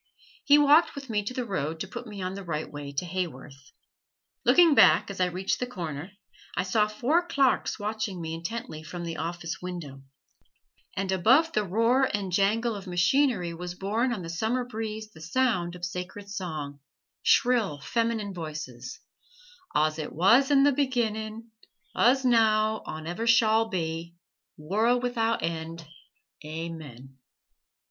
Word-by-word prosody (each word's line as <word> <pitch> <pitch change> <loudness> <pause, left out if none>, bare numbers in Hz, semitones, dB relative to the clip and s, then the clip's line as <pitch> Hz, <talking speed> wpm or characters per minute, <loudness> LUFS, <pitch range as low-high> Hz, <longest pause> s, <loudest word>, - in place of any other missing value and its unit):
He 290 0 +6
walked 295 +3 +5
with 275 -4 -7
me 210 -1 +1
to 250 - -4
the 250 -2 -2
road 160 -6 -3
to - - -4
put 240 0 -8
me 205 -3 -7
on 185 +1 -3
the 200 0 -7
right 160 -3 -3
way 145 -1 -7
to 140 +5 -3
Haworth. 150 -6 -6 0.7
Looking 345 -3 +6
back 235 - +5
as 195 - -8
I 180 - +4
reached 185 +2 -2
the 250 - -2
corner, 170 - -6 0.5
I 180 - +2
saw 210 +3 +2
four 260 +11 +1
"clarks" 275 -5 +1
watching 210 -3 -3
me 160 -1 -4
intently 165 -1 -5
from 175 +2 -7
the 165 -1 -5
office 165 0 -4
windows, 170 -7 -7 1.0
and 190 0 -1
above 260 - +4
the 215 - +1
roar 230 +7 +2
and 200 -3 -2
jangle 215 +5 +1
of 200 -1 -8
machinery 180 +1 +2
was 175 +1 -6
borne 220 +7 0
on 210 -7 -3
the 165 - -6
summer 220 +9 -1
breeze 220 -2 -5
the 160 - -15
sound 180 -2 0
of 175 0 -4
sacred 190 +3 -6
song 155 -8 -5 0.4
shrill 230 -11 +3
feminine 220 +6 -1
voices: 155 -3 -7 0.7
"Aws 155 +1 +1
ut - - -7
wuz 230 - +5
in 280 -1 +5
th' 285 -2 +3
beginnin', 225 -4 -2 0.4
uz 260 +3 +4
now 220 -2 +3
awn 155 0 -6
ever 175 +8 -3
shawl 225 -1 +4
be, 165 -2 -3 0.4
worl' 215 +10 +1
wi'out 230 -2 0
end 165 0 -4 0.6
Aamen!" 150 -5 -8
195 Hz, 155 wpm, -27 LUFS, 165-230 Hz, 1.0 s, He